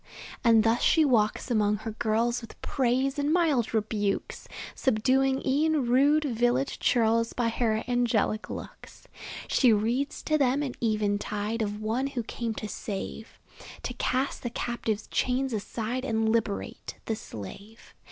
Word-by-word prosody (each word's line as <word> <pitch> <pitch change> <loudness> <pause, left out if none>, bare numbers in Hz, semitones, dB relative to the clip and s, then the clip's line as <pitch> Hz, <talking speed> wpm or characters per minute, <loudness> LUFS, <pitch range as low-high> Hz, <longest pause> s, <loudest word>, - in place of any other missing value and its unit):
And 225 -3 +6
thus 225 +2 +2
she 320 -2 +4
walks 230 -2 +1
among 210 -2 +3
her 225 - -2
girls 230 +3 0
With 230 - -12
praise 265 +2 0
and 285 +1 +1
mild 315 -9 +2
rebukes; 210 -2 -2 0.3
Subduing 265 +3 +1
e'en 295 +1 +2
rude 280 +5 +4
village 245 +1 0
churls 230 -1 +2
By 240 -2 0
her 225 -1 0
angelic 235 -3 +1
looks. - - -9 0.4
She 250 -4 +4
reads 235 +8 0
to 310 0 +1
them 275 +1 +2
at 265 -4 -3
eventide 210 0 -1
Of 210 -1 -2
One 235 +5 0
who 260 -4 -3
came 230 0 -4
to 215 - -5
save; 210 +2 -6 0.5
To - - -3
cast 260 +2 -1
the 240 - -3
captive's 230 -3 -3
chains 255 0 0
aside, 225 +4 -3
And 225 -4 0
liberate 220 -3 -2
the 225 - -1
slave. 200 - -10
235 Hz, 140 wpm, -28 LUFS, 220-265 Hz, 0.5 s, And